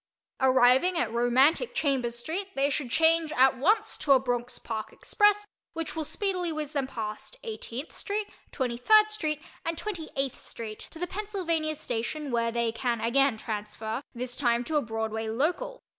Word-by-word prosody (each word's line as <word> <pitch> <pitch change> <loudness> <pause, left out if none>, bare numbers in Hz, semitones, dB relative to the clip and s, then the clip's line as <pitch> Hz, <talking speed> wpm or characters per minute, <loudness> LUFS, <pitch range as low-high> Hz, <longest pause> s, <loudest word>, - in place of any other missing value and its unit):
Arriving 260 +7 +5
at 235 -8 0
romantic 260 - +3
Chambers 255 -5 +1
St. 380 +5 -2
they 275 +1 +2
should 275 -3 -2
change 320 +2 +3
at 265 -1 +4
once 400 - +2
to 295 -3 +5
a 265 - +6
Bronx 245 -1 -2
Park 220 -1 -5
Express 415 0 +2 0.3
which 330 -1 -4
will 320 - -1
speedily 360 +3 -1
whizz 305 -1 -4
them 275 -3 0
past 220 - -6
18th 320 - -6
St., 410 +1 -3 0.2
23rd 265 - +4
St. 310 -9 -1 0.2
and 330 0 -2
28th 315 - -3
St. 215 -2 -7
to - - -11
the 355 - -1
Pennsylvania 360 -6 -2
Station 285 +1 -3
where 230 -1 +1
they 235 -1 0
can 235 0 -1
again 260 +1 +3
transfer, 220 +2 -4
this 245 +1 -3
time 240 -3 +2
to 310 +5 -3
a 295 - +4
Broadway 220 -1 -3
Local. 350 - -1
275 Hz, 160 wpm, -28 LUFS, 235-330 Hz, 0.3 s, a